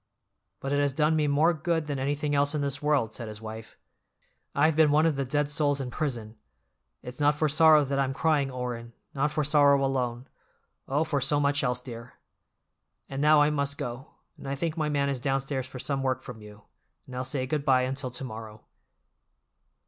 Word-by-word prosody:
"But 135 Hz, +1 st, -3 dB
it 145 Hz, -, +2 dB
has 145 Hz, -1 st, +1 dB
done 155 Hz, +2 st, +2 dB
me 150 Hz, -1 st, +1 dB
more 150 Hz, +4 st, +3 dB
good 160 Hz, 0 st, -1 dB
than 145 Hz, -2 st, -3 dB
anything 145 Hz, +2 st, -1 dB
else 145 Hz, +1 st, +2 dB
in 150 Hz, -, -1 dB
this 140 Hz, 0 st, -2 dB
world," 145 Hz, -7 st, +1 dB
said 115 Hz, -1 st, -6 dB
his 105 Hz, -1 st, -8 dB
wife. 110 Hz, 0 st, -9 dB, 0.8 s
"I've 155 Hz, +2 st, +3 dB
been 160 Hz, -1 st, +5 dB
one 150 Hz, +2 st, +4 dB
of 160 Hz, -3 st, +2 dB
the 135 Hz, 0 st, -2 dB
dead 145 Hz, +3 st, 0 dB
souls 145 Hz, -1 st, +1 dB
in 130 Hz, -2 st, -4 dB
prison. 115 Hz, -8 st, -4 dB, 0.7 s
It's 125 Hz, +2 st, -8 dB
not 145 Hz, 0 st, +3 dB
for 155 Hz, +1 st, +1 dB
sorrow 155 Hz, 0 st, +6 dB
that 140 Hz, 0 st, -1 dB
I'm 135 Hz, -1 st, +1 dB
crying, 145 Hz, -1 st, +1 dB
Orrin, 120 Hz, -2 st, -5 dB, 0.2 s
not 140 Hz, +2 st, +1 dB
for 150 Hz, 0 st, -1 dB
sorrow 140 Hz, -1 st, +4 dB
alone—oh, 130 Hz, +2 st, -4 dB
for 150 Hz, -3 st, -1 dB
so 145 Hz, +3 st, +2 dB
much 145 Hz, 0 st, +1 dB
else, 125 Hz, -1 st, 0 dB
dear! 115 Hz, -1 st, -9 dB, 1.0 s
And 135 Hz, 0 st, -4 dB
now 150 Hz, 0 st, +6 dB
I 150 Hz, -, +2 dB
must 140 Hz, -1 st, -1 dB
go, 120 Hz, +4 st, -6 dB, 0.2 s
and 135 Hz, -, -7 dB
I 140 Hz, -, -1 dB
think 160 Hz, +3 st, -2 dB
my 155 Hz, -2 st, -1 dB
man 140 Hz, -1 st, +1 dB
is 140 Hz, -2 st, -1 dB
downstairs 135 Hz, 0 st, -2 dB
for 130 Hz, -, -9 dB
some 135 Hz, +2 st, -2 dB
work 130 Hz, -1 st, -1 dB
from 110 Hz, -3 st, -9 dB
you, 105 Hz, 0 st, -13 dB, 0.4 s
and 125 Hz, -, -10 dB
I'll 125 Hz, -, -2 dB
say 130 Hz, 0 st, -2 dB
good 145 Hz, +2 st, -2 dB
by 130 Hz, -2 st, +3 dB
until 130 Hz, 0 st, -2 dB
to 125 Hz, +2 st, -5 dB
morrow." 110 Hz, -3 st, -8 dB
140 Hz, 200 wpm, -27 LUFS, 125-150 Hz, 1.0 s, sorrow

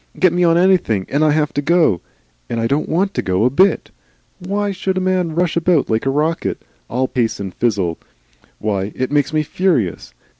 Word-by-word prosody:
Get 185 Hz, -2 st, +4 dB
me 180 Hz, 0 st, +1 dB
on 165 Hz, -1 st, +4 dB
anything, 175 Hz, -, +2 dB
and 145 Hz, +3 st, +1 dB
I 155 Hz, -, +4 dB
have 150 Hz, 0 st, +1 dB
to 145 Hz, -, -1 dB
go. 155 Hz, -, +2 dB, 0.5 s
And 115 Hz, -, -2 dB
I 115 Hz, -, 0 dB
don't 140 Hz, +6 st, 0 dB
want 195 Hz, +4 st, 0 dB
to -, -, -1 dB
go 95 Hz, +4 st, 0 dB
a 125 Hz, -, +3 dB
bit. 185 Hz, +6 st, +2 dB, 0.5 s
WHY 200 Hz, +3 st, -2 dB
should 190 Hz, 0 st, -2 dB
a -, -, +2 dB
man 185 Hz, -3 st, 0 dB
rush 175 Hz, -1 st, 0 dB
about 170 Hz, -6 st, +2 dB
like 110 Hz, +4 st, 0 dB
a -, -, +3 dB
rocket, 155 Hz, +4 st, -1 dB, 0.3 s
all 130 Hz, +2 st, 0 dB
pace 120 Hz, -3 st, -1 dB
and 95 Hz, -2 st, -5 dB
fizzle? 95 Hz, -8 st, -1 dB, 0.6 s
Why? 100 Hz, -1 st, -2 dB
It 130 Hz, +1 st, -2 dB
makes 145 Hz, 0 st, +1 dB
me 155 Hz, -1 st, +1 dB
furious. 135 Hz, -, -1 dB
150 Hz, 200 wpm, -18 LUFS, 115-180 Hz, 0.6 s, Get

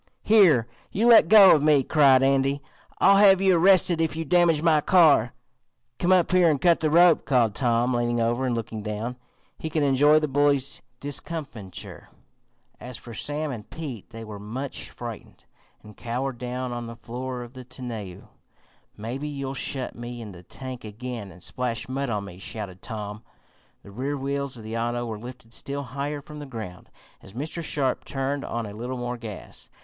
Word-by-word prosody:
"Here! 175 Hz, -, +5 dB, 0.2 s
You 215 Hz, +4 st, 0 dB
let 235 Hz, -2 st, +8 dB
go 205 Hz, -3 st, +9 dB
of 150 Hz, -, +3 dB
me!" 150 Hz, -2 st, +4 dB
cried 135 Hz, -2 st, +5 dB
Andy. 135 Hz, +1 st, +2 dB, 0.4 s
"I'll 200 Hz, -, +6 dB
have 195 Hz, -2 st, +7 dB
you 190 Hz, -1 st, +4 dB
arrested 175 Hz, -1 st, +4 dB
if 160 Hz, -1 st, 0 dB
you 165 Hz, 0 st, -3 dB
damage 165 Hz, -1 st, +3 dB
my 160 Hz, -3 st, +4 dB
car." 150 Hz, -10 st, +5 dB, 0.7 s
"Come 180 Hz, -, +1 dB
up 180 Hz, -2 st, +4 dB
here 180 Hz, -2 st, +5 dB
and 145 Hz, -3 st, +1 dB
cut 170 Hz, +3 st, +4 dB
the 155 Hz, -, +1 dB
rope," 170 Hz, +1 st, +5 dB
called 120 Hz, -6 st, +2 dB
Tom 120 Hz, +1 st, +1 dB
leaning 120 Hz, 0 st, 0 dB
over 120 Hz, +3 st, 0 dB
and 120 Hz, -, 0 dB
looking 110 Hz, -1 st, -5 dB
down. 105 Hz, +4 st, -4 dB, 0.4 s
He 160 Hz, -, -4 dB
could 155 Hz, -1 st, 0 dB
enjoy 145 Hz, +2 st, +5 dB
the 155 Hz, 0 st, +1 dB
bully's 140 Hz, -1 st, +1 dB, 0.2 s
discomfiture. 145 Hz, -, -6 dB, 0.7 s
As 125 Hz, -2 st, -8 dB
for 120 Hz, -, -11 dB
Sam 150 Hz, +5 st, -3 dB
and 110 Hz, -5 st, -8 dB
Pete, 140 Hz, -, -7 dB
they 115 Hz, -1 st, -9 dB
were 105 Hz, -2 st, -8 dB
much 125 Hz, +7 st, -6 dB
frightened, 120 Hz, -3 st, -9 dB, 0.4 s
and 105 Hz, -1 st, -13 dB
cowered 125 Hz, +1 st, -4 dB
down 125 Hz, 0 st, -4 dB
on 120 Hz, -1 st, -5 dB
the 115 Hz, -, -8 dB
floor 125 Hz, +2 st, -6 dB
of 120 Hz, +1 st, -12 dB
the 130 Hz, -1 st, -9 dB
tonneau. 120 Hz, -7 st, -8 dB, 0.7 s
"Maybe 125 Hz, +7 st, -5 dB
you'll 140 Hz, -2 st, -4 dB
shut 135 Hz, -1 st, -3 dB
me 120 Hz, +1 st, -7 dB
in 110 Hz, -3 st, -8 dB
the 90 Hz, -2 st, -12 dB
tank 130 Hz, +6 st, -9 dB
again 110 Hz, -1 st, -7 dB
and 90 Hz, -, -14 dB
splash 125 Hz, -3 st, -3 dB
mud 135 Hz, +1 st, -3 dB
on 105 Hz, -3 st, -2 dB
me!" 90 Hz, -2 st, -11 dB
shouted 95 Hz, -3 st, -7 dB
Tom. 105 Hz, -2 st, -6 dB, 0.6 s
The 100 Hz, -, -13 dB
rear 135 Hz, +7 st, -3 dB
wheels 140 Hz, -1 st, -3 dB
of 115 Hz, -, -10 dB
the 110 Hz, +1 st, -6 dB
auto 120 Hz, +1 st, -1 dB
were 110 Hz, -2 st, -5 dB
lifted 120 Hz, -1 st, -11 dB
still 140 Hz, +3 st, -5 dB
higher 140 Hz, +3 st, -4 dB
from 150 Hz, 0 st, -10 dB
the 145 Hz, -, -8 dB
ground, 110 Hz, -8 st, -8 dB, 0.3 s
as 95 Hz, -, -14 dB
Mr. 155 Hz, +7 st, -5 dB
Sharp 135 Hz, -4 st, -1 dB
turned 135 Hz, +1 st, -3 dB
on 115 Hz, -1 st, -3 dB
a 100 Hz, -, -8 dB
little 120 Hz, +4 st, -5 dB
more 120 Hz, 0 st, -3 dB
gas. 110 Hz, -5 st, -10 dB
130 Hz, 185 wpm, -25 LUFS, 115-150 Hz, 0.7 s, go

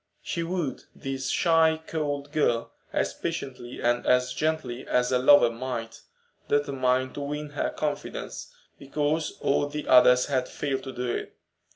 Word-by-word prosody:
She 170 Hz, -, -2 dB
wooed 165 Hz, -5 st, -3 dB
this 135 Hz, -1 st, -4 dB
shy, 160 Hz, -2 st, +3 dB
cold 145 Hz, -2 st, -3 dB
girl 120 Hz, -7 st, +1 dB, 0.2 s
as -, -, 0 dB
patiently 125 Hz, -2 st, -5 dB
and 120 Hz, 0 st, +1 dB
as 125 Hz, 0 st, +2 dB
gently 155 Hz, -6 st, -2 dB
as 125 Hz, 0 st, +2 dB
a 125 Hz, -, +3 dB
lover 130 Hz, -2 st, +6 dB
might, 115 Hz, -2 st, -5 dB, 0.5 s
determined 130 Hz, -3 st, +1 dB
to 145 Hz, -, -5 dB
win 150 Hz, +1 st, -4 dB
her 145 Hz, -, -1 dB
confidence, 150 Hz, -1 st, -4 dB, 0.3 s
because 150 Hz, +3 st, -1 dB
all 145 Hz, +1 st, +2 dB
the 150 Hz, +1 st, -5 dB
others 125 Hz, 0 st, +7 dB
had 130 Hz, -3 st, -1 dB
failed 135 Hz, -2 st, -2 dB
to 130 Hz, -, -5 dB
do 125 Hz, 0 st, -4 dB
it. 120 Hz, -, -4 dB
135 Hz, 150 wpm, -27 LUFS, 125-150 Hz, 0.5 s, others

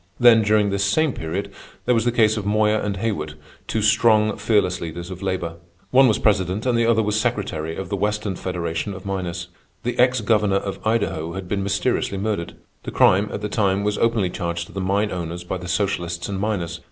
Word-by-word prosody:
Then, 120 Hz, -2 st, +7 dB
during 105 Hz, -1 st, +2 dB
this 100 Hz, 0 st, 0 dB
same 145 Hz, +8 st, +2 dB
period, 85 Hz, +5 st, -4 dB, 0.3 s
there 125 Hz, -, +3 dB
was 115 Hz, -1 st, +1 dB
the 120 Hz, -, +3 dB
case 110 Hz, -2 st, +3 dB
of 105 Hz, -, -3 dB
Moyer 105 Hz, +1 st, +2 dB
and 100 Hz, -1 st, -2 dB
Haywood, 80 Hz, -8 st, -3 dB, 0.3 s
two 110 Hz, -, -1 dB
strong, 110 Hz, 0 st, +4 dB
fearless 100 Hz, -5 st, +1 dB
leaders 85 Hz, +2 st, -6 dB
of 90 Hz, -, -8 dB
labor. 90 Hz, -4 st, -3 dB, 0.3 s
One 130 Hz, +1 st, +6 dB
was 110 Hz, -3 st, +3 dB
president 100 Hz, 0 st, +1 dB
and 125 Hz, -2 st, +2 dB
the 115 Hz, 0 st, +2 dB
other 110 Hz, -1 st, +3 dB
was 105 Hz, 0 st, 0 dB
secretary 80 Hz, -4 st, -2 dB
of 95 Hz, 0 st, -6 dB
the 100 Hz, -, -1 dB
Western 105 Hz, 0 st, -1 dB
Federation 90 Hz, +2 st, -3 dB
of 95 Hz, +1 st, -10 dB
Miners. 90 Hz, -3 st, -4 dB, 0.3 s
The 120 Hz, +1 st, -3 dB
ex 125 Hz, -1 st, +4 dB
governor 105 Hz, -2 st, +2 dB
of 100 Hz, 0 st, -2 dB
Idaho 85 Hz, -7 st, 0 dB
had 95 Hz, 0 st, -6 dB
been 100 Hz, +1 st, -1 dB
mysteriously 100 Hz, +1 st, 0 dB
murdered. 100 Hz, -4 st, -3 dB, 0.3 s
The -, -, -6 dB
crime, 100 Hz, +3 st, +4 dB
at -, -, -4 dB
the 105 Hz, -, -2 dB
time, 100 Hz, -2 st, +1 dB
was 105 Hz, 0 st, -1 dB
openly 115 Hz, -6 st, +1 dB
charged 85 Hz, -3 st, -3 dB
to -, -, -16 dB
the 95 Hz, -, -3 dB
mine 100 Hz, +3 st, 0 dB
owners 85 Hz, -1 st, -4 dB
by 90 Hz, +1 st, -3 dB
the 90 Hz, -, -8 dB
socialists 85 Hz, -2 st, -1 dB
and 100 Hz, -1 st, -3 dB
miners. 90 Hz, -5 st, -2 dB
100 Hz, 210 wpm, -22 LUFS, 90-110 Hz, 0.3 s, Then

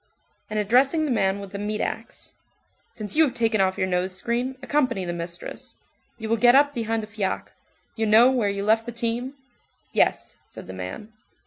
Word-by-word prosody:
And 215 Hz, -, -3 dB
addressing 260 Hz, +9 st, +3 dB
the 290 Hz, -, -1 dB
man 195 Hz, -4 st, +1 dB
with 200 Hz, -1 st, -9 dB
the 200 Hz, -, -5 dB
meat 210 Hz, +1 st, -2 dB
axe:— -, -, -5 dB, 0.6 s
"Since 210 Hz, +1 st, -6 dB
you 320 Hz, -, +6 dB
have 265 Hz, -5 st, 0 dB
taken 225 Hz, -3 st, +2 dB
off 190 Hz, 0 st, +1 dB
your -, -, +1 dB
nose 185 Hz, 0 st, -1 dB
screen, 240 Hz, +6 st, -2 dB
accompany 255 Hz, -9 st, 0 dB
the 175 Hz, -, -3 dB
mistress. 170 Hz, 0 st, -7 dB, 0.4 s
You 220 Hz, -1 st, -6 dB
will 230 Hz, +1 st, +1 dB
get 240 Hz, +2 st, +6 dB
up 285 Hz, +1 st, +5 dB
behind 225 Hz, -2 st, -2 dB
the -, -, -7 dB
fiacre. 205 Hz, -3 st, -3 dB, 0.4 s
You 220 Hz, -1 st, 0 dB
know 230 Hz, +4 st, +7 dB
where 240 Hz, -6 st, +1 dB
you 200 Hz, 0 st, -3 dB
left 225 Hz, +2 st, +2 dB
the -, -, -3 dB
team?" 235 Hz, +3 st, -2 dB, 0.6 s
"Yes," -, -, +1 dB
said -, -, -11 dB
the 95 Hz, -, -8 dB
man. 95 Hz, -, -7 dB
220 Hz, 195 wpm, -24 LUFS, 200-245 Hz, 0.6 s, know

